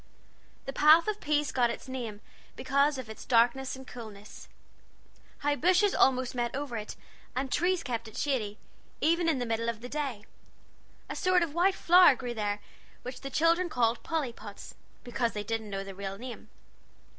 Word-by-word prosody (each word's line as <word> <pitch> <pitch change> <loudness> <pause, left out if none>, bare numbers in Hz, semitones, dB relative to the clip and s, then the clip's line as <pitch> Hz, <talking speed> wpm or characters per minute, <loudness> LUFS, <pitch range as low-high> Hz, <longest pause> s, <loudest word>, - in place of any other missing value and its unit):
The 270 - -5
Path 310 +5 +6
of 425 -1 -2
Peace 295 0 +1
got 245 -2 +2
its 235 - -6
name 235 -5 -5 0.3
because 280 +2 +2
of 260 -3 -6
its 220 - -9
darkness 245 +3 +2
and 265 0 -11
coolness. 215 -5 -11 0.9
High 290 0 +1
bushes 370 +6 +3
almost 255 -1 +3
met 240 -1 -2
over 280 -3 -4
it, 215 -1 -5 0.4
and 260 0 -2
trees 355 +3 +1
kept 235 -4 -3
it 220 - -11
shady, 220 -8 -1 0.4
even 335 +1 +2
in 310 - +1
the 245 - -2
middle 230 0 -1
of 230 -2 -4
the 245 - -7
day. 270 -8 -3 0.8
A - - -5
sort 365 -1 +3
of 315 -4 -4
white 370 +3 +3
flower 350 -5 +7
grew 245 -1 -5
there, 205 -2 -2 0.4
which 250 +1 -7
the 275 - -5
children 335 +5 +2
called 235 -4 +1
Pollypods, 235 -10 -5 0.3
because 240 -1 -1
they 210 - -3
didn't 220 0 -3
know 195 -1 -3
the 195 0 -8
real 195 0 -5
name. 245 +1 -9
255 Hz, 175 wpm, -29 LUFS, 225-300 Hz, 0.9 s, flower